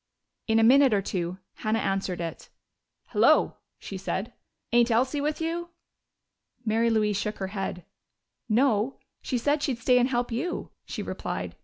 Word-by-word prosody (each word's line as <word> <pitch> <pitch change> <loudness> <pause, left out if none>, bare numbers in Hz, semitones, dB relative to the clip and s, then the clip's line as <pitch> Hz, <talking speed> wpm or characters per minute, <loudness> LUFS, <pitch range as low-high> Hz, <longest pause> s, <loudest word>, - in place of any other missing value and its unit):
In 220 -1 +3
a 225 - +5
minute 260 0 +6
or 200 - +2
two 180 -1 -3 0.2
Hannah 215 +1 0
answered 195 -4 -1
it. 165 -1 -6 0.6
"Hello!" - - +4 0.2
she 195 - -7
said. 195 +4 -3 0.4
"Ain't 240 0 +4
Elsie 260 +5 +2
with 300 +1 -1
you?" 335 +1 -2 1.0
Mary 225 +1 +2
Louise 210 -3 +2
shook 210 +1 -3
her 190 -1 -3
head. 190 -3 -4 0.6
"No. 235 +1 +2 0.2
She 255 - -1
said 290 +5 +1
she'd 270 -5 0
stay 250 +2 +4
and 250 +1 +2
help 245 -1 -1
you," 330 +10 -3
she - - -5
replied. - - -4
230 Hz, 155 wpm, -27 LUFS, 205-260 Hz, 1.0 s, minute